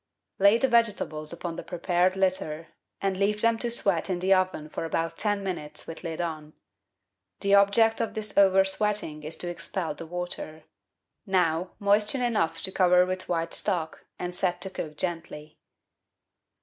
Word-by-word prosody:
Lay 200 +3 +6
the 265 - +2
vegetables 210 -10 +1
upon 170 0 -5
the - - -6
prepared 180 +1 0
litter, 185 -4 -1 0.3
and 195 -1 +1
leave 205 +2 0
them 230 0 +2
to 240 - -1
sweat 195 -7 0
in 185 - 0
the 185 +2 +3
oven 185 -5 0
for 155 - -5
about 165 0 -2
ten 205 -2 -1
minutes 150 -6 -5
with 165 - -9
lid 165 -2 -5
on. 155 -3 -4 0.9
The 200 0 +2
object 200 +3 +5
of 230 - -3
this 215 -1 -5
oven 195 -1 +5
sweating 195 -5 -1
is 155 +2 -6
to 180 - -4
expel 175 -1 -4
the 160 +2 -9
water. 175 -2 -5 0.6
Now 180 -2 +1
moisten 210 +5 +2
enough 190 -9 0
to 190 - +8
cover 180 -1 +4
with 185 0 -3
white 165 -1 -1
stock, 170 -6 -2
and 180 0 -4
set 180 0 0
to 190 - -3
cook 155 -5 -6
gently. 160 -3 -5
185 Hz, 165 wpm, -27 LUFS, 165-200 Hz, 0.9 s, to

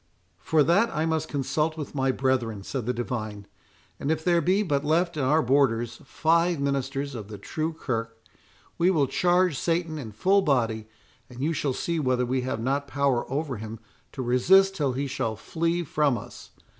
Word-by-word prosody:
"For 155 -2 +3
that 185 +10 +3
I 155 -6 -1
must 160 -1 0
consult 150 +3 -1
with 150 -3 -6
my 135 -2 +1
brethren," 125 -6 -1
said 125 +1 -4
the - - +2
divine; 110 -4 -4 0.5
"and 140 - -3
if 160 0 0
there 175 -1 +3
be 190 +5 +2
but 145 -6 0
left 170 +3 +1
in 150 - -1
our 150 +5 +3
borders 120 -3 +1
five 165 +3 +2
ministers 140 0 -2
of 110 -5 -7
the 105 -1 -8
true 155 +10 -3
kirk, 115 -7 -4 0.6
we 175 +2 +4
will 155 -7 +3
charge 175 +2 +2
Satan 165 -2 -1
in 115 -6 -7
full 190 - +3
body, 115 - 0 0.4
and 125 -1 -11
you 155 +5 0
shall 140 -3 -1
see 170 +5 -2
whether 130 -3 +1
we 130 +1 0
have 125 -3 -3
not 140 +4 -1
power 135 -3 0
over 140 -2 -2
him 110 +1 -7 0.4
to 130 - -4
resist 190 +11 +4
till 140 -7 0
he 140 +3 -2
shall 130 -5 -2
flee 170 +9 -1
from 150 -5 +1
us. - - -10
140 Hz, 185 wpm, -26 LUFS, 125-160 Hz, 0.6 s, we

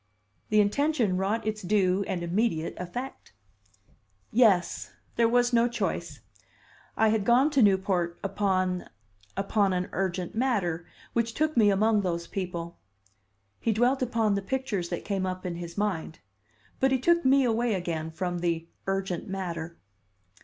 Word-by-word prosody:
The 215 - +4
intention 235 -1 +1
wrought 200 +5 -1
its 215 -1 -2
due 190 0 +2
and 175 -2 -2
immediate 170 -2 0
effect. 240 - -7 1.0
"Yes. 210 -7 +3 0.2
There 230 -1 +3
was 245 +1 +3
no 235 0 +4
choice. 240 0 -3 0.8
I 220 - +4
had 215 -1 +1
gone 250 +7 +4
to 280 -3 +3
Newport 190 -4 +2
upon 185 -2 0 0.5
upon 200 0 +1
an 180 0 -1
urgent 185 -1 -2
matter, 200 -9 0 0.3
which 230 0 0
took 310 0 0
me 215 -3 +5
among 210 +2 +3
those 170 -3 -2
people." 170 -2 -5 0.8
He 230 - +1
dwelt 245 +5 +2
upon 225 -4 +1
the 200 - 0
pictures 200 -5 -2
that 175 - -4
came 195 -2 -1
up 185 0 -5
in 175 -2 -3
his 170 0 -7
mind. 185 -6 -2 0.6
But 265 0 +3
he 265 - +4
took 340 +6 +3
me 270 +1 +5
away 235 -2 +1
again 165 -3 -3
from 175 +2 -3
the 165 -1 -1 0.2
"urgent 195 -2 -2
matter." 170 -3 -4
195 Hz, 145 wpm, -28 LUFS, 180-230 Hz, 1.0 s, me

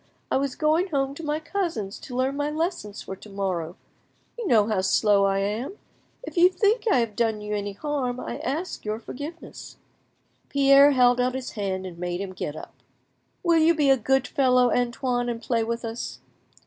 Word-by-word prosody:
I - - +3
was 275 -1 -1
going 320 +4 +2
home 275 -5 -1
to 330 - -9
my 300 0 -1
cousins 315 - -3
to 250 - -9
learn 260 +2 0
my 290 +1 -1
lessons 310 - -3
for 190 - -6
to 210 - -13
morrow; 185 -4 -3 0.6
you 470 -4 -4
know 220 -8 +5
how 215 -3 0
slow 200 +1 +3
I 195 0 +1
am. 215 - -2 0.5
If 410 - -8
you 350 +1 +7
think 420 +4 +1
I - - +5
have 230 -3 0
done 225 -3 0
you 210 0 -5
any 205 -1 -3
harm, 255 0 -2
I - - -5
ask 315 +8 -3
your 215 0 -2
forgiveness." 290 +8 -9 0.7
Pierre 275 0 +6
held 245 -1 +4
out 250 +1 0
his 260 -1 -5
hand 190 -3 -3
and 175 -2 -8
made 175 0 -3
him 195 -1 -5
get 150 -5 -5
up. - - -9 0.7
"Will 340 -2 +4
you 325 +1 +4
be 290 -3 +3
a - - +7
good 265 +2 +1
fellow, 255 -4 +3
Antoine, 245 0 0
and 235 -1 -3
play 230 -1 0
with 230 +1 -3
us?" 230 +1 -5
250 Hz, 195 wpm, -25 LUFS, 210-295 Hz, 0.7 s, you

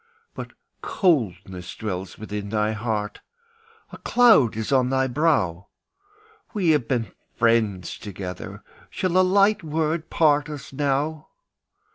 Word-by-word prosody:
But - - -8 0.3
coldness 95 - -1
dwells 95 -4 -5
within 105 -1 -6
thy 105 0 0
heart, 110 -1 -3 0.7
A - - -10
cloud 220 - +4
is 110 +3 -3
on 130 -2 +3
thy 130 0 +2
brow; 125 - 0 0.9
We 180 -6 +3
have 145 -6 +1
been 115 -6 -1 0.3
friends 110 -6 +1
together, 95 -3 -7 0.3
Shall 185 -2 -2
a 185 - +6
light 200 +2 +3
word 160 +1 -1
part 150 -2 +3
us 145 -2 -8
now? 145 +3 -1
130 Hz, 120 wpm, -24 LUFS, 105-155 Hz, 0.9 s, a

